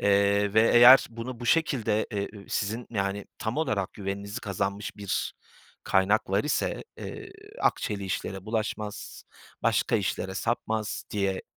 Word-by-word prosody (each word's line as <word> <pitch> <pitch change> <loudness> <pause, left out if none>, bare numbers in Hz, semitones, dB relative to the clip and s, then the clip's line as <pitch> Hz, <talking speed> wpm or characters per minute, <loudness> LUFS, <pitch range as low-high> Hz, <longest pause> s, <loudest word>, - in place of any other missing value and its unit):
eee, 100 0 +3
ve 110 +1 +5
eğer 120 +3 +9
bunu 115 +1 -7
bu 120 - -5
şekilde 125 -8 +2
e 100 -1 -1
ü 100 - -12
sizin, 110 +4 -2
yani, 100 -2 -2
tam 110 +4 -3
olarak 110 -12 -1
güveninizi 100 0 -5
kazanmış 100 +1 -3
bir 100 -2 -2 0.5
kaynaklar 100 +1 +2
ise, 150 - -1
eee, 405 -3 -8 0.3
akçeli 100 -2 0
işlere 95 0 -4
bulaşmaz, 110 -1 -4 0.4
başka - - +2
işlere 95 0 -2
sapmaz 110 -1 -2
diye 100 -2 -1
105 Hz, 130 wpm, -27 LUFS, 100-115 Hz, 0.5 s, eğer